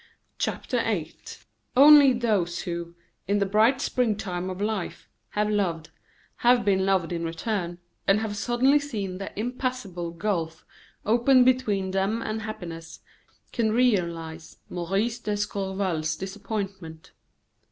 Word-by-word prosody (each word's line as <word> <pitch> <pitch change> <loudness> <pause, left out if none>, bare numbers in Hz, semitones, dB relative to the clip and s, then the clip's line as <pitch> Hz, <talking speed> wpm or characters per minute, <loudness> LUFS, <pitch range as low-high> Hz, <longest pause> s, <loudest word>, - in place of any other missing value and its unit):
CHAPTER - - -1
VIII - - -2 0.6
Only 285 0 +9
those 210 -8 0
who, 170 -1 -5 0.3
in 200 +1 +2
the 200 - +2
bright 220 +6 +3
springtime 205 -9 -1
of 185 0 -6
life, 210 -2 -3 0.3
have 210 0 +2
loved, 180 -7 -1 0.5
have 245 -1 +4
been 190 -1 +2
loved 190 -4 +1
in 170 -1 -3
return, 175 +1 -3 0.3
and 195 +2 +5
have 215 -2 -3
suddenly 245 +7 +3
seen 205 -10 -5
an 195 - -4
impassable 225 -6 -3
gulf 170 -2 -3 0.4
open 245 +4 +5
between 215 -7 +1
them 195 +4 0
and 220 -1 -3
happiness, 170 -7 -7 0.5
can 220 -2 0
realize 170 -9 0
Maurice 195 +7 -1
d'Escorval's 195 -6 -2
disappointment. 195 -4 -6
200 Hz, 120 wpm, -26 LUFS, 175-225 Hz, 0.6 s, Only